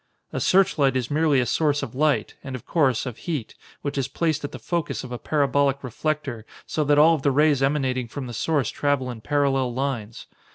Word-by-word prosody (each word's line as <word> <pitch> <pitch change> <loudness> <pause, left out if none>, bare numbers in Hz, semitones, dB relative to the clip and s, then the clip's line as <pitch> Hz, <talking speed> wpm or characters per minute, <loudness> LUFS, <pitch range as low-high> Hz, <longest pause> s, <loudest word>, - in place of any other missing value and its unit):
"A - - -1
searchlight 160 -8 +3
is 125 0 -3
merely 150 -2 +3
a 125 - +1
source 145 +4 +1
of 115 - -6
light, 150 +2 +1
and 135 -1 -5
of 130 - -9
course, 135 -8 +1
of 125 -4 -6
heat, 150 -10 -4 0.3
which 140 -1 -2
is 130 - -1
placed 160 -3 -1
at 145 - -4
the - - -7
focus 170 -2 -3
of 125 - -8
a 125 - -4
parabolic 140 -2 +1
reflector 130 -2 -3 0.2
so 155 - -1
that 145 0 +3
all 160 +3 +7
of 155 - -1
the 140 - +2
rays 145 0 +3
emanating 135 -3 0
from 135 +3 -6
the 120 - -7
source 140 +1 0
travel 140 -3 0
in 115 -2 -9
parallel 135 -3 +1
lines. 125 -5 -3
140 Hz, 210 wpm, -24 LUFS, 130-150 Hz, 0.3 s, all